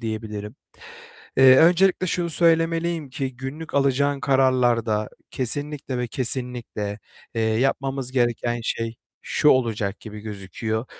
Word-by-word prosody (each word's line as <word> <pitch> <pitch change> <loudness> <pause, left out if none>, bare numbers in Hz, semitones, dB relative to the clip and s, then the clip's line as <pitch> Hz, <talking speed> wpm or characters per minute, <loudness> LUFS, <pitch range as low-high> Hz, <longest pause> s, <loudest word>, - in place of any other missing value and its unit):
diyebilirim. 110 -2 -5 0.8
Eee, 130 0 +8
öncelikle 180 +4 +4
şunu 170 -1 -1
söylemeliyim 165 -2 +2
ki 130 -1 -4
günlük 140 +6 -7
alacağın 140 0 +2
kararlarda 120 -6 +2 0.2
kesinlikle 140 +1 -2
ve 125 - -1
kesinlikle, 120 -5 -2 0.4
eee, 115 - 0
yapmamız 130 +3 0
gereken 120 -1 0
şey 115 0 -3 0.3
şu 150 - +2
olacak 110 -6 +1
gibi 105 -1 -9
gözüküyor: 110 +2 -4
130 Hz, 110 wpm, -23 LUFS, 110-140 Hz, 0.8 s, Eee